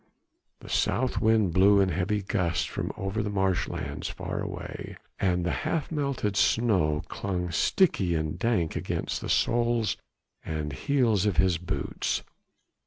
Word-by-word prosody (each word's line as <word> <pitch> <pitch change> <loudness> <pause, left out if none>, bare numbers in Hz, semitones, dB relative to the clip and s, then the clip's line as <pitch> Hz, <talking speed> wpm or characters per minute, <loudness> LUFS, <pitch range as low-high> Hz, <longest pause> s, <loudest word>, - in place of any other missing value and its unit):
The - - -12
south 130 +1 0
wind 110 -5 +3
blew 100 +2 +6
in 95 -1 +3
heavy 95 +4 0
gusts 90 -4 0
from - - -3
over 95 +3 -2
the 105 - -2
marshlands 95 -2 -1
far - - -4
away, - - -6 0.2
and 90 -2 +1
the 90 - +1
half 165 -1 -1
melted 140 -9 -1
snow 95 -10 +2
clung 90 -3 -3
sticky 90 - +2
and 80 +1 -2
dank 100 -8 +1
against - - -2
the - - -5
soles 120 -1 +2 0.5
and 75 -2 -3
heels 110 - +2
of 100 - 0
his 95 -3 +3
boots. 90 +1 -2
95 Hz, 140 wpm, -27 LUFS, 90-110 Hz, 0.5 s, blew